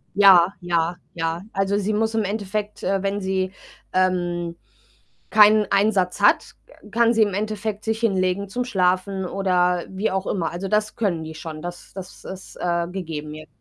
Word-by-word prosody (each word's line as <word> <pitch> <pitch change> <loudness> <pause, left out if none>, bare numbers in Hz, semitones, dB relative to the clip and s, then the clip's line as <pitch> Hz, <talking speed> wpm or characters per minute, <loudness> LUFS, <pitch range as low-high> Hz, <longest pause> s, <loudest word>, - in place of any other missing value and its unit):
Ja, 195 -2 +7
ja, 170 0 0 0.2
ja. 165 +1 -2
Also, 195 +1 +1
sie 210 +1 -1
muss 220 +1 0
im 220 - +2
Endeffekt, 205 +1 -3
äh 195 0 0
wenn 200 +1 -1
sie, 190 0 -1 0.4
ähm, 175 -2 0 0.8
keinen 215 -1 +6
Einsatz 195 -3 +2
hat, - - +3 0.4
kann 235 +1 +3
sie 225 - +4
im 205 -3 +1
Endeffekt 215 0 -3
sich 220 0 -1
hinlegen 195 -2 0
zum 245 +5 -2
Schlafen 190 -3 0
oder 180 -2 +1
wie 195 +3 -2
auch 190 0 -2
immer. 170 -5 -1
Also, 180 +3 -4
das 210 +1 0
können 180 -8 -1
die 160 0 -8
schon, 155 0 -7
das 175 0 -8
das 185 -2 -10
ist, 190 0 -9
äh, 170 -1 0
gegeben 160 -5 -5
je 155 0 -10
190 Hz, 170 wpm, -23 LUFS, 175-210 Hz, 0.8 s, Ja